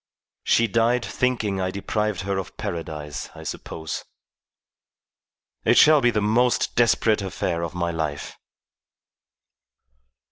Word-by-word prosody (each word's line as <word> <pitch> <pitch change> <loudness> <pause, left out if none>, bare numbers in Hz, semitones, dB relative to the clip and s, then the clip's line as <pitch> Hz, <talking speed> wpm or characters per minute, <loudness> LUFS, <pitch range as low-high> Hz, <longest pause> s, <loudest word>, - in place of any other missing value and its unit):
She 115 - +3
died 115 +3 +1
thinking 110 -6 -1
I 95 - 0
deprived 105 +1 -2
her 100 0 -2
of 95 - -8
Paradise, 75 -3 -5
I - - -10
suppose. 80 -2 -5 1.6
It - - +4
shall 155 -1 +7
be 120 - +4
the 110 - 0
most 115 +4 +2
desperate 115 -2 +3
affair 90 -3 -2
of 85 0 -4
my 85 -1 -1
life." 75 -3 -4
100 Hz, 115 wpm, -24 LUFS, 85-115 Hz, 1.6 s, shall